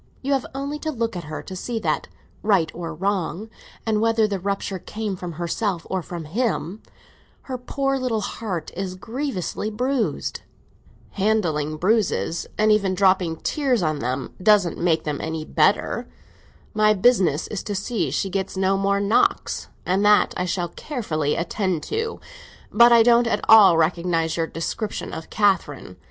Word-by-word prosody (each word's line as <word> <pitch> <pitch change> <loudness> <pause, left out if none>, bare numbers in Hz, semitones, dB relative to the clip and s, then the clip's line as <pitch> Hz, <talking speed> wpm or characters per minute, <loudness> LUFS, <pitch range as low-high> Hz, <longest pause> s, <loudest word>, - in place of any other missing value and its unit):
You 280 +2 +1
have 270 -2 0
only 280 +2 -3
to 315 - -3
look 230 -5 -2
at 175 -3 -5
her 155 0 -6
to 190 - -8
see 230 +5 -4
that, - - -1 0.3
right 195 -6 +2
or 165 -1 -5
wrong, 190 +3 -2 0.3
and 215 -2 +1
whether 225 -1 +3
the 200 -2 -2
rupture 195 0 -3
came 210 +1 -4
from 180 -2 -6
herself 175 +2 -2
or 190 -1 0
from 170 -1 -7
him, 205 +1 -2 0.6
her 260 - -5
poor 270 +2 -1
little 240 -4 -1
heart 195 -6 -4
is 185 0 -4
grievously 220 - -3
bruised." 250 +3 -1 0.7
"Handling 170 -8 0
bruises—and 215 +1 +1
even 200 -3 +2
dropping 185 -3 +3
tears 260 - 0
on 155 -2 0
them—doesn't 170 - +1
make 165 -2 +1
them 150 -2 -3
any 160 -1 -4
better! - - +1 0.7
My 215 0 +4
business 190 - +3
is 210 - -3
to 205 - -4
see 215 +3 -1
she 195 - -2
gets 190 0 -3
no 190 +1 +2
more 200 0 +1
knocks, 200 +2 +1 0.2
and 190 +3 +1
that 210 0 +4
I 180 - -1
shall 175 -1 -2
carefully 160 - -2
attend 180 -1 -1
to. 450 +1 -3 0.5
But 235 +2 +7
I 235 -1 +7
don't 235 0 +5
at 210 -2 -1
all 205 -6 +8
recognise 165 0 +1
your 165 -1 -1
description 200 +7 -4
of 160 - -7
Catherine. 170 - 0
195 Hz, 155 wpm, -23 LUFS, 170-220 Hz, 0.7 s, all